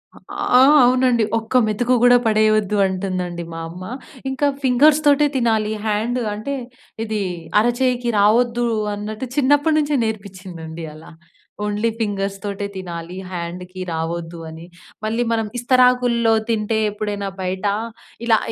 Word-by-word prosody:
ఆ! 250 - +1 0.2
అవునండి, 250 -2 +3
"ఒక్క 225 +3 -5
మెతుకు 240 +4 +1
కూడా 245 0 +7
పడేయవద్దంటుందండి," 195 -5 +1
మా 165 - -6
అమ్మ. 180 +2 -9 0.5
ఇంకా 265 +2 0 0.2
ఫింగర్స్‌తోటే 290 +3 +4
తినాలి, 220 -4 +1
హాండ్ 220 +4 0
అంటే, 215 +7 -4 0.5
ఇది 215 -2 -2 0.4
అరచేయికి 240 +1 +1
రావద్దన్నట్టు, 215 0 +1
చిన్నప్పటి 290 +2 +3
నుంచే 295 -1 +1
నేర్పించిందండి 180 -6 -6
అలా. 155 +1 -13 0.5
ఓన్లీ 210 +2 0
ఫింగర్స్‌తోటే 200 -1 -3
తినాలి, 175 -1 -7
హాండ్‌కి 180 +1 -6
రావద్దని. 165 0 -5 0.4
మళ్ళీ 225 +2 0
మనం 225 -1 0
ఇస్తరాకులో 245 -2 +3 0.2
తింటే, 220 0 0
ఎప్పుడైనా 205 -1 -3
బయట 185 +2 -3 0.6
ఇలా 220 -1 +5
215 Hz, 105 wpm, -20 LUFS, 190-245 Hz, 0.6 s, కూడా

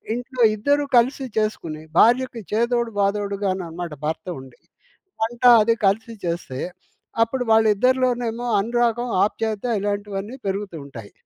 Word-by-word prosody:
ఇంట్లో 245 +1 -6 0.2
ఇద్దరూ 285 +6 +1
కలిసి 260 +3 +2
చేసుకొని 165 -8 -2 0.2
భార్యకి 245 0 +4
చేదోడు, 235 +1 +1
బాదోడుగానన్నమాట 195 -5 -2
భర్త 160 +3 -3
ఉండి. 130 -2 -15 0.6
వంట 235 +2 -3 0.2
అది 230 +1 +3
కలిసి 225 +4 0
చేస్తే, 170 -6 -4 0.6
అప్పుడు 250 +2 -3
వాళ్ళిద్దరిలోనేమో 240 +2 +2
అనురాగం, 240 +2 0 0.2
ఆప్యాయత 215 0 -2 0.2
ఇలాంటివన్నీ 205 +2 -3
పెరుగుతూ 195 -3 -3
ఉంటాయి. 115 -7 -11
220 Hz, 105 wpm, -22 LUFS, 195-240 Hz, 0.6 s, భార్యకి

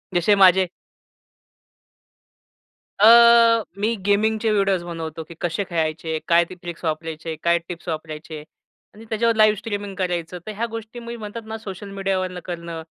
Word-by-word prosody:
जशे 175 +4 +4
माझे 190 -1 +6 2.3
अ, 210 - +7 0.7
मी 225 +3 +1
गेमिंगचे 220 +2 +2
व्हिडिओस 195 -3 +1
बनवतो 165 -2 -6
की 170 - -12
कशे 175 +4 -1
खेळायचे? 160 -2 -2
काय 170 0 +5
ते 185 - -11
ट्रिक्स 175 0 -8
वापरायचे? 160 0 -3
काय 170 0 +3
टिप्स 175 0 -8
वापरायचे? 155 -1 -6 0.5
आणि 220 +2 -13
त्याच्यावर 230 +1 +1
लाईव्ह 215 -1 +5
स्ट्रीमिंग 205 -2 -5
करायचं. 180 -2 -3
तर 215 - -5
ह्या 235 +2 -1
गोष्टी 225 +1 -7
मी 235 0 -7
म्हणतात 220 +1 -7
ना 220 0 -6
सोशल 200 -1 -8
मीडियावरनं 185 -2 -2
करणं, 170 -2 -6
185 Hz, 145 wpm, -22 LUFS, 165-210 Hz, 2.3 s, अ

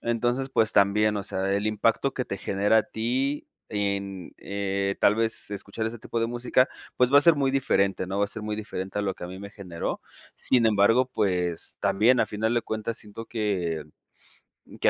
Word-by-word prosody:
Entonces, 120 +3 0
pues 110 -4 +2
también, 105 +1 +3
o 100 - -2
sea, 95 -1 -1
el 100 +2 0
impacto 115 +5 +1
que 125 - -2
te 100 - -5
genera 100 +4 +2
a - - +3
ti 130 +6 -2 0.2
en, 100 -2 -3
eh, 100 0 -2
tal 105 - +5
vez 115 -1 +1
escuchar 100 +2 -4
ese 115 +1 -5
tipo 115 - -4
de 115 - +1
música, 120 +2 +2 0.3
pues 125 +1 +3
va 145 - +9
a - - +6
ser 165 +2 +6
muy 135 -1 +1
diferente, 100 -9 +1
¿no? 95 +2 -3
Va 100 - +3
a - - -2
ser 105 +1 -6
muy 105 0 -3
diferente 95 -2 -5
a - - 0
lo 95 -2 -1
que - - -13
a - - -4
mí 95 - -8
me 100 +1 -8
generó. 90 -5 -5 0.4
Sin 125 -3 +2
embargo, 110 +4 +4
pues 90 -5 0
también, 120 +5 +3
a - - +3
final 110 +3 -1
de 120 - +1
cuentas 110 +1 -3
siento 110 +1 -9
que 90 -8 -2 1.0
que - - +5
105 Hz, 205 wpm, -26 LUFS, 100-115 Hz, 1.0 s, va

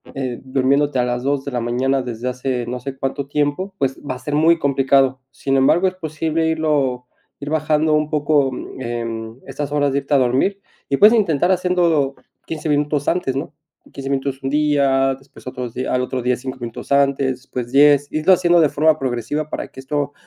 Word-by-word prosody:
eh, 130 -3 -3
durmiéndote 135 +1 +1
a 125 - +2
las 125 0 -2
2 140 0 0
de 140 - -4
la 125 - -1
mañana 130 +3 0
desde 120 -1 -5
hace 125 -1 -3
no 125 +1 -4
sé 135 +2 -7
cuánto 135 +1 -3
tiempo, 150 +7 -1
pues, 135 -4 -1
va 135 -3 -4
a - - -10
ser 145 +3 -3
muy 165 +2 +4
complicado, 135 -2 +2
sin 135 -1 -1
embargo, 165 +8 +4
es 185 - -3
posible 160 -1 -2
irlo, 145 -6 0 0.3
ir 145 +1 -6
bajando 155 0 +1
un 150 0 +1
poco, 145 -2 +2 0.3
em, 115 -1 -5
estas 140 +1 -5
horas 145 -1 +2
de 140 - +1
irte 140 +1 -4
a 140 - +6
dormir, 135 +11 +1 0.3
y 140 - 0
puedes 210 +7 +7
intentar 175 -5 +2
haciéndolo 170 -6 +1 0.3
15 160 -1 -4
minutos 145 0 0
antes, 150 -7 -1
¿no?, 140 +2 -4 0.4
15 135 0 -6
minutos 135 0 -2
un 135 - -1
día, 140 -3 +2
después, 135 +1 -18
otros 125 -2 -5
días, 130 - -3
al 125 - +2
otro 125 0 -3
día, 125 +1 +1
5 130 +1 -6
minutos 115 +2 -7
antes, 140 -1 +2
después 125 -2 -6
10, 145 0 +5
irlo 155 +5 +2
haciendo 175 -2 +4
de 150 - +4
forma 155 +2 +3
progresiva 135 +4 -2
para - - -4
que - - -14
esto 145 +1 -2
140 Hz, 200 wpm, -20 LUFS, 130-150 Hz, 0.4 s, puedes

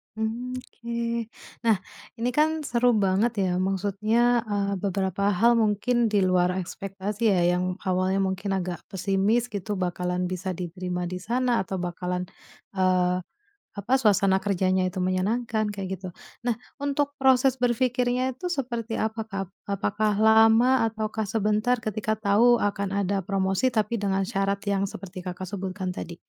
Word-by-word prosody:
Hmm, 230 +3 -3
oke. 235 -2 -4 0.4
Nah, 225 - +6 0.4
ini 235 +1 -1
kan 310 +3 +1
seru 245 -2 +2
banget 195 +5 +2
ya. 180 -1 0
Maksudnya, 210 +5 +2
eee, 200 -1 -1
beberapa 195 0 -1
hal 230 +4 +4
mungkin 230 +3 +2
di 205 -3 +2
luar 180 -1 +2
ekspektasi 195 +4 -3
ya, 180 - +2
yang 180 0 -1
awalnya 190 0 +1
mungkin 190 +1 -1
agak 180 -2 -3
pesimis 200 +5 0
gitu 205 0 -3
bakalan 180 -1 -1
bisa 185 0 -3
diterima 180 0 -4
di 180 +1 -4
sana, 240 +4 +1
atau 190 0 -3
bakalan, 180 0 -3 0.5
eee, 185 -1 +2 0.6
apa, 215 +6 -1
suasana 195 -3 +4
kerjanya 190 -1 +1
itu 185 - -6
menyenangkan 215 +4 0
kayak 195 -2 -5
gitu. 185 - -7 0.4
Nah, 240 - +2 0.3
untuk 285 0 0
proses 265 -1 +4
berpikirnya 250 +1 +1
tuh 360 - -3
seperti 235 -6 -3
apa, 220 +1 -1
Kak? 195 -3 -5
Ap - - -29 0.3
apakah 210 +1 +1
lama 225 +3 +5
ataukah 220 0 -3
sebentar 215 +3 +1
ketika 215 0 -1
tahu 220 +4 +5
akan 200 -1 -1
ada 195 +1 0
promosi, 195 +3 +1
tapi 225 +1 0
dengan 195 -1 0
syarat 200 -2 0
yang 200 -1 +1
seperti 185 -1 -8
Kakak 180 0 -5
sebutkan 190 -1 -4
tadi? 170 0 -6
205 Hz, 145 wpm, -26 LUFS, 185-235 Hz, 0.6 s, Nah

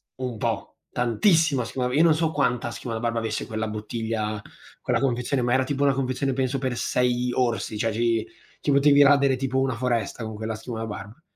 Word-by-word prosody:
un 125 -3 -4
po'. 110 -2 -1 0.3
Tantissima 135 - +2
schiuma 125 +1 -2
io 150 - +4
non 165 -2 +5
so 160 0 0
quanta 125 -5 0
schiuma 115 +3 -5
da - - -3
barba 115 0 -1
avesse 110 -1 -3
quella 110 0 -3
bottiglia 110 0 -3 0.4
quella - - +1
confezione, 125 0 0
ma 120 0 +1
era 130 0 +3
tipo 140 +2 -1
una 140 - +4
confezione 135 0 -1
penso 130 +1 0
per 130 -2 -2
6 125 +1 0
orsi, 120 -3 -1
cioè 115 +1 0
ci 115 0 +1 0.3
ci 145 - 0
potevi 140 +1 +6
radere, 140 -1 +5
tipo, 130 0 -1
una 130 -2 0
foresta 115 -2 -1
con 110 0 -5
quella 110 +1 -4
schiuma 110 +1 -6
da 115 - -3
barb 105 +7 -8
125 Hz, 200 wpm, -25 LUFS, 115-135 Hz, 0.4 s, potevi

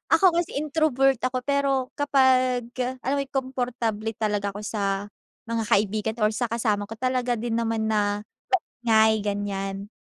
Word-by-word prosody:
Ako, 370 -4 +4
kasi 340 -4 -1
introvert 285 -3 +2
ako, 255 0 -2
pero 275 -2 +1
kapagka 255 -2 +2
alam 275 +2 0
mo - - +1
yon 275 - -17
komportable 245 -4 -2
talaga 205 -2 0
ako - - -5
sa 200 -1 -2 0.4
mga 230 -1 -1
kaibigan 215 +2 +1
o - - +6
sa 240 +2 -1
kasama 215 -3 0
ko, 225 - -7
talaga 255 -1 0
din 230 0 -2
naman 225 -1 0
na 205 -1 +1 0.7
ngay, 220 -1 +5
ganyan. 200 -1 -3
230 Hz, 150 wpm, -25 LUFS, 210-260 Hz, 0.7 s, o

